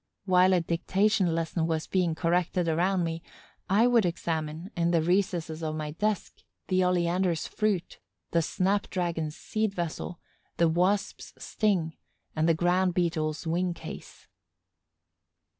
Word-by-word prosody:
While 185 0 +5
a 180 - +3
dictation 180 +2 +1
lesson 165 0 -1
was 160 -1 -1
being 175 -4 0
corrected 175 +1 0
around 175 +3 +1
me, 165 0 -3 0.5
I 205 +5 +4
would 240 -2 +4
examine, 165 0 -3
in 170 0 +1
the 170 -1 +3
recesses 175 -3 0
of 155 -1 -2
my 155 -1 -4
desk, 210 +6 -2 0.3
the 185 -1 +3
oleander's 180 -1 +1
fruit, 205 -5 -2 0.3
the 170 - +3
snap 195 +5 0
dragon's 165 -4 -2
seed 215 -2 -2
vessel, 175 0 -4 0.4
the 170 - +4
Wasp's 185 +5 0
sting 185 -7 0 0.4
and 160 +1 +2
the 165 - +4
Ground 180 +2 +2
beetle's 160 -3 -1
wing 175 +2 0
case. - - -10
175 Hz, 135 wpm, -28 LUFS, 165-185 Hz, 0.5 s, While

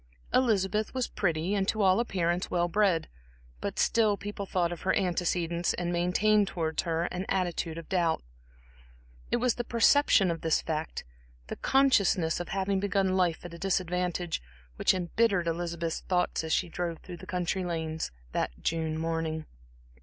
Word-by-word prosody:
Elizabeth 215 -2 +2
was 255 -2 0
pretty 170 0 -1
and 195 -2 0
to 215 -1 +1
all 190 +1 +5
appearance, 180 -6 0
well 175 -1 +1
bred, 190 -2 +2 0.5
but - - -4
still 215 -3 +3
people 205 -1 -6
thought 175 -2 0
of 175 - -6
her 190 - +1
antecedents 175 -2 0
and 175 0 -2
maintained 200 +4 +3
towards 160 -4 -1
her 165 -1 -1
an 180 +1 -3
attitude 175 -3 -1
of 165 - -8
doubt. 175 -4 +1 1.1
It - - +1
was 245 0 +2
the 240 - -3
perception 235 -5 +4
of 165 - -4
this 160 -1 +2
fact, 160 0 -3 0.5
the - - -3
consciousness 200 -12 +3
of 175 - -5
having 195 0 0
begun 195 -1 +1
life 175 -3 +1
at 175 - -8
a 170 - -9
disadvantage, 180 - -1 0.3
which 190 - +3
embittered 185 +1 +1
Elizabeth's 170 0 -2
thoughts 180 -2 0
as 160 - -4
she 180 - +2
drove 170 0 -3
through 180 -2 -8
the - - -12
country 180 +1 -1
lanes 160 -2 -3 0.2
that - - 0
June 160 -1 -1
morning. 160 -1 -2
180 Hz, 160 wpm, -29 LUFS, 165-195 Hz, 1.1 s, all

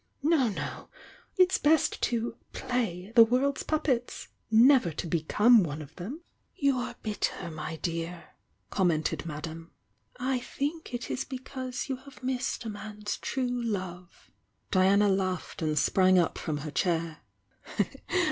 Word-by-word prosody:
No, 300 -5 +4
no! 200 - -5 0.5
It's 370 0 +4
best 305 +1 +3
to 235 -1 0 0.2
'play' 210 -6 -2
the 230 - +10
world's 255 +5 +1
puppets— 275 -6 -1 0.2
never 240 -2 +6
to 155 - -5
be 165 -1 0
come 220 +8 +5
one 155 -4 -3
of 150 0 -10
them!" 190 +8 -5
_ 320 - -10 0.4
"You 280 -2 +3
are 245 - -4
bitter, 205 -5 -2
my 155 +1 -5
dear!" 170 +1 -4 0.4
commented 170 -3 +1
Madame. 165 +2 -6 0.5
"I 260 0 0
think 290 +6 -4
it 245 -1 -4
is 270 - -1
because 260 -1 -5
you 265 -2 -2
have 265 0 -15
missed 255 -1 -2
a - - -3
man's 210 0 -5
true 245 -2 -2
love." 185 -5 -5 0.4
Diara 195 +2 +5
laughed 185 -3 -3
and 155 -1 0
sprang 185 +4 +4
up 175 -2 +2
from 155 -2 -2
her 150 - -4
chair. 165 -1 0
210 Hz, 145 wpm, -29 LUFS, 170-255 Hz, 0.5 s, the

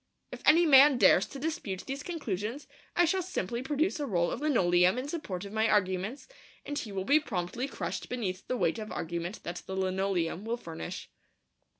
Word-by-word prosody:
If - - -8
any 335 +3 +7
man 280 -2 +7
dares - - +5
to - - -9
dispute 275 - -3
these 275 +1 -4
conclusions, 245 - -4 0.3
I 350 - +5
shall 375 +3 +1
simply 240 - -3
produce 300 +6 0
a 290 - -2
roll 175 -6 +1
of - - -4
linoleum 185 -9 +3
in 255 +2 -3
support 205 - -4
of 200 - -9
my 220 +1 +2
arguments, 195 +5 0 0.4
and 290 - -4
he 220 -7 -4
will 190 -1 -3
be 290 +6 +5
promptly 220 - -3
crushed - - -5
beneath 200 -7 -3
the 255 - -1
weight 230 - +1
of 215 0 -6
argument 170 +3 -4
that 175 +1 -5
the 190 - -4
linoleum 190 -2 -1
will 230 +2 -2
furnish. 165 - -7
220 Hz, 190 wpm, -30 LUFS, 185-285 Hz, 0.4 s, any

